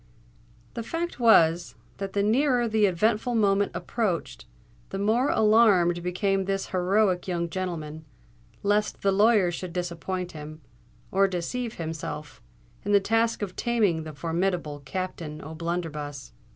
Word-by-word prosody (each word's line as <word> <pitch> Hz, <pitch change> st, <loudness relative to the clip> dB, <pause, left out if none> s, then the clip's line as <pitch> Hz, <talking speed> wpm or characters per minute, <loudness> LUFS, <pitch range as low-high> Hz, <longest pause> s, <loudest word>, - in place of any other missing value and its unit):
The 235 Hz, -, -4 dB
fact 330 Hz, +6 st, -4 dB
was, 175 Hz, -8 st, +4 dB, 0.2 s
that 195 Hz, -1 st, -5 dB
the 200 Hz, -, +1 dB
nearer 245 Hz, +2 st, +2 dB
the 215 Hz, -2 st, +3 dB
eventful 215 Hz, +6 st, +1 dB
moment 200 Hz, -2 st, +2 dB
approached, 180 Hz, -, -2 dB, 0.4 s
the -, -, -4 dB
more 220 Hz, +7 st, +2 dB
alarmed 205 Hz, -6 st, +4 dB
became 190 Hz, +2 st, 0 dB
this 195 Hz, 0 st, -2 dB
heroic 185 Hz, 0 st, +1 dB
young 170 Hz, -2 st, -2 dB
gentleman, 160 Hz, -4 st, -4 dB, 0.6 s
lest 205 Hz, +1 st, 0 dB
the 200 Hz, -, +3 dB
lawyer 205 Hz, -2 st, +4 dB
should 175 Hz, 0 st, -6 dB
disappoint 180 Hz, +1 st, -3 dB
him, 155 Hz, 0 st, -9 dB, 0.5 s
or 195 Hz, +1 st, +4 dB
deceive 220 Hz, +7 st, -3 dB
himself, 155 Hz, -3 st, -6 dB, 0.4 s
in 205 Hz, -, 0 dB
the 200 Hz, -, +7 dB
task 225 Hz, +2 st, +1 dB
of 185 Hz, -3 st, -5 dB
taming 210 Hz, -9 st, +1 dB
the 155 Hz, -1 st, -8 dB
formidable 165 Hz, -1 st, -2 dB
Captain 160 Hz, 0 st, -5 dB
O'Blunderbuss. 155 Hz, -3 st, -5 dB
185 Hz, 130 wpm, -26 LUFS, 170-210 Hz, 0.6 s, the